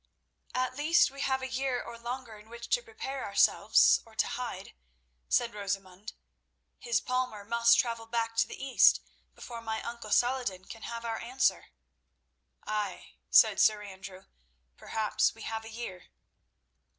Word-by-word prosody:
"At 255 Hz, 0 st, 0 dB
least 305 Hz, +1 st, +4 dB
we 275 Hz, 0 st, -8 dB
have 265 Hz, -1 st, 0 dB
a -, -, -2 dB
year 260 Hz, -1 st, -1 dB
or 235 Hz, -, -8 dB
longer 240 Hz, 0 st, -6 dB
in 215 Hz, +1 st, -18 dB
which 235 Hz, 0 st, -9 dB
to -, -, +2 dB
prepare 355 Hz, -, -6 dB
ourselves, 65 Hz, -, +4 dB
or -, -, -19 dB
to -, -, +2 dB
hide," -, -, -5 dB, 0.6 s
said 235 Hz, -2 st, +2 dB
Rosamund. 195 Hz, 0 st, -5 dB, 0.7 s
"His 235 Hz, -2 st, +1 dB
palmer 250 Hz, -5 st, -2 dB
must 235 Hz, +1 st, +4 dB
travel 230 Hz, -1 st, -1 dB
back 230 Hz, 0 st, -1 dB
to 230 Hz, -, +3 dB
the -, -, -9 dB
East 270 Hz, -1 st, +5 dB, 0.3 s
before 235 Hz, -1 st, -8 dB
my 220 Hz, -1 st, -3 dB
uncle 235 Hz, -2 st, -7 dB
Saladin 230 Hz, -4 st, +1 dB
can 225 Hz, -, -10 dB
have 235 Hz, +1 st, -6 dB
our 225 Hz, -1 st, -2 dB
answer." 255 Hz, +3 st, 0 dB, 1.0 s
"Ay," 210 Hz, -3 st, -3 dB, 0.2 s
said -, -, +6 dB
Sir 215 Hz, -1 st, +4 dB
Andrew; 190 Hz, -1 st, -10 dB, 0.5 s
"perhaps 215 Hz, -, 0 dB
we 225 Hz, -, -11 dB
have 225 Hz, 0 st, -4 dB
a -, -, -8 dB
year." 220 Hz, -6 st, -7 dB
230 Hz, 150 wpm, -30 LUFS, 210-255 Hz, 1.0 s, said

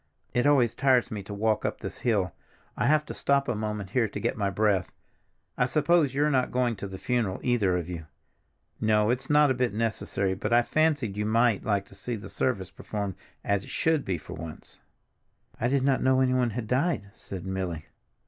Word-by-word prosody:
It 125 Hz, +3 st, +2 dB
always 125 Hz, -6 st, +4 dB
tires 130 Hz, -2 st, +3 dB
me 105 Hz, -2 st, -4 dB
to 100 Hz, -, -10 dB
walk 105 Hz, +1 st, 0 dB
up -, -, -2 dB
this -, -, -6 dB
hill; 100 Hz, -7 st, +1 dB, 0.4 s
I -, -, 0 dB
have 150 Hz, +1 st, +3 dB
to -, -, -6 dB
stop 140 Hz, 0 st, +1 dB
a 120 Hz, -, +1 dB
moment 105 Hz, -2 st, -4 dB
here 120 Hz, -2 st, +2 dB
to 105 Hz, -, -6 dB
get -, -, -1 dB
my 100 Hz, -2 st, 0 dB
breath. 100 Hz, -2 st, +1 dB, 0.7 s
I 125 Hz, -, +3 dB
suppose 150 Hz, 0 st, +2 dB
you're 150 Hz, +2 st, +2 dB
not 130 Hz, -2 st, +1 dB
going 125 Hz, -2 st, +1 dB
to 100 Hz, -, -5 dB
the 95 Hz, -1 st, -7 dB
funeral, 115 Hz, -4 st, -1 dB
either 105 Hz, -8 st, +2 dB
of 85 Hz, -2 st, -4 dB
you? 85 Hz, -3 st, -6 dB, 0.7 s
No, 110 Hz, 0 st, +3 dB
it's 125 Hz, +1 st, -3 dB
not 150 Hz, -1 st, +5 dB
a -, -, +3 dB
bit 125 Hz, -4 st, -1 dB
necessary, 105 Hz, -3 st, -1 dB
but 95 Hz, -, -3 dB
I 120 Hz, 0 st, +5 dB
fancied 145 Hz, -9 st, +1 dB
you 105 Hz, 0 st, -1 dB
might 115 Hz, -1 st, +3 dB
like 100 Hz, -2 st, +1 dB
to -, -, -15 dB
see 115 Hz, +5 st, -5 dB
the 105 Hz, -, -8 dB
service 95 Hz, -8 st, -1 dB
performed 100 Hz, -1 st, -4 dB, 0.3 s
as 100 Hz, -1 st, 0 dB
it -, -, -12 dB
should 160 Hz, -3 st, +1 dB
be 95 Hz, -2 st, -1 dB
for 75 Hz, -, -10 dB
once." 80 Hz, -1 st, -9 dB, 0.8 s
"I 120 Hz, -, +1 dB
did 135 Hz, +1 st, +1 dB
not 135 Hz, -1 st, +2 dB
know 130 Hz, 0 st, +3 dB
anyone 130 Hz, -2 st, +2 dB
had 115 Hz, 0 st, -4 dB
died," 125 Hz, -, 0 dB
said 95 Hz, -2 st, -8 dB
Milly. 95 Hz, -4 st, -3 dB
115 Hz, 205 wpm, -27 LUFS, 100-130 Hz, 0.8 s, not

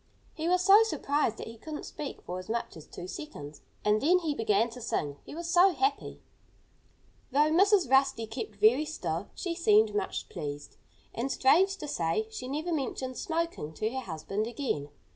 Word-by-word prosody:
He 320 Hz, +2 st, -2 dB
was 365 Hz, 0 st, +3 dB
so 400 Hz, +3 st, +8 dB
surprised 290 Hz, -, 0 dB
that -, -, -6 dB
he 225 Hz, 0 st, -10 dB
couldn't 305 Hz, +3 st, -7 dB
speak 290 Hz, -, -7 dB
for 180 Hz, +1 st, -5 dB
as 185 Hz, -, -10 dB
much 235 Hz, +1 st, -3 dB
as 160 Hz, -, -12 dB
two 175 Hz, -, -8 dB
seconds. 155 Hz, -, -8 dB, 0.2 s
And 210 Hz, +1 st, +3 dB
then 350 Hz, +6 st, +5 dB
he 325 Hz, -4 st, -1 dB
began 220 Hz, -3 st, +2 dB
to 250 Hz, +2 st, -9 dB
sing 145 Hz, -10 st, -2 dB
he -, -, -9 dB
was 340 Hz, +1 st, -5 dB
so 355 Hz, +2 st, +5 dB
happy. 400 Hz, +4 st, -1 dB, 1.1 s
Though 295 Hz, +3 st, +3 dB
Mrs. 390 Hz, +1 st, +4 dB
Rusty 265 Hz, -3 st, +3 dB
kept 220 Hz, -1 st, -6 dB
very 220 Hz, +8 st, +4 dB
still, 200 Hz, -, -4 dB
she 350 Hz, -, -3 dB
seemed 215 Hz, -, +4 dB
much 205 Hz, -2 st, -2 dB
pleased. 145 Hz, -3 st, -7 dB, 0.4 s
And, 255 Hz, +4 st, -2 dB
strange 375 Hz, +11 st, +4 dB
to 300 Hz, -, -6 dB
say, 180 Hz, -, -1 dB
she 250 Hz, +3 st, -6 dB
never 310 Hz, +6 st, -2 dB
mentioned 260 Hz, -3 st, -3 dB
smoking 330 Hz, -, -2 dB
to 215 Hz, +7 st, -2 dB
her 260 Hz, -, -3 dB
husband 195 Hz, +1 st, -3 dB
again. 235 Hz, -, -3 dB
255 Hz, 180 wpm, -29 LUFS, 210-320 Hz, 1.1 s, so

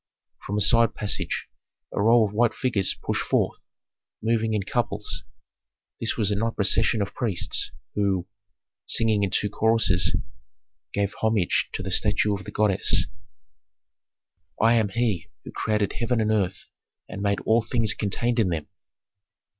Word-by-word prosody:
From 105 Hz, -, -2 dB
a -, -, +1 dB
side 115 Hz, +2 st, +4 dB
passage 105 Hz, -1 st, -1 dB, 0.5 s
a -, -, -1 dB
row 115 Hz, +1 st, +5 dB
of 105 Hz, -, -5 dB
white 120 Hz, +2 st, +2 dB
figures 110 Hz, -7 st, 0 dB
pushed -, -, -1 dB
forth, -, -, -1 dB, 0.5 s
moving 110 Hz, 0 st, 0 dB
in 100 Hz, -, -1 dB
couples. 105 Hz, -2 st, -2 dB, 0.8 s
This 115 Hz, -, -1 dB
was 105 Hz, -3 st, +1 dB
a -, -, +1 dB
night 115 Hz, +2 st, -1 dB
procession 110 Hz, +1 st, +2 dB
of 100 Hz, -, -7 dB
priests, 105 Hz, -8 st, 0 dB, 0.2 s
who, 100 Hz, -3 st, 0 dB, 0.6 s
singing 110 Hz, -2 st, +2 dB
in 100 Hz, -, +1 dB
two 105 Hz, -, +1 dB
choruses, 105 Hz, -3 st, +2 dB, 0.8 s
gave 100 Hz, 0 st, -1 dB
homage 110 Hz, -5 st, +1 dB
to -, -, -4 dB
the 95 Hz, -, -4 dB
statue 105 Hz, +2 st, +2 dB
of 95 Hz, -2 st, -5 dB
the -, -, -7 dB
goddess: 105 Hz, -3 st, +3 dB, 1.5 s
Chorus 115 Hz, +1 st, +4 dB
I. -, -, +4 dB
"I -, -, +5 dB
am 105 Hz, -2 st, 0 dB
He 110 Hz, -5 st, -1 dB
who -, -, -9 dB
created 105 Hz, -2 st, -1 dB
heaven 120 Hz, 0 st, -1 dB
and 110 Hz, -1 st, +1 dB
earth 95 Hz, -4 st, -1 dB, 0.4 s
and -, -, -7 dB
made 100 Hz, 0 st, +1 dB
all 115 Hz, +1 st, +3 dB
things 110 Hz, -2 st, +1 dB
contained 115 Hz, +4 st, 0 dB
in 105 Hz, -5 st, +2 dB
them." 80 Hz, -3 st, -2 dB
105 Hz, 155 wpm, -25 LUFS, 100-115 Hz, 1.5 s, row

